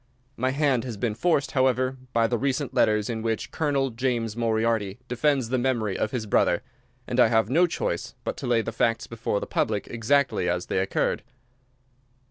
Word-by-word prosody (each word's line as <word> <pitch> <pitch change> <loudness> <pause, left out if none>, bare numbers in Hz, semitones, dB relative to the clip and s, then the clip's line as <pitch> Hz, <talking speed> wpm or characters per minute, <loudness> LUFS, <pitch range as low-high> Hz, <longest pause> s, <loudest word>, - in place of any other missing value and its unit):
My 130 +2 0
hand 135 -3 +1
has 120 -4 -5
been 110 +1 -1
forced, 140 +4 +1
however, 130 -1 +2 0.2
by 115 0 +3
the 120 0 0
recent 135 +1 -1
letters 105 -1 +2
in 115 -2 -3
which 115 -1 -2
Colonel 140 -4 0
James 115 -2 -1
Moriarty 115 -3 0
defends 130 -1 +1
the 130 0 +1
memory 120 -6 0
of - - -1
his 115 -1 -3
brother, 100 -1 +2 0.4
and 125 0 -2
I 125 - +7
have 110 0 +2
no 175 +5 +5
choice - - -3
but - - -3
to - - -5
lay 115 -2 +2
the - - -4
facts 115 +1 0
before 115 -3 -2
the - - -4
public 105 -2 -1
exactly 120 -5 +1
as 90 0 -1
they - - -1
occurred. 95 - 0
120 Hz, 185 wpm, -26 LUFS, 110-130 Hz, 0.4 s, I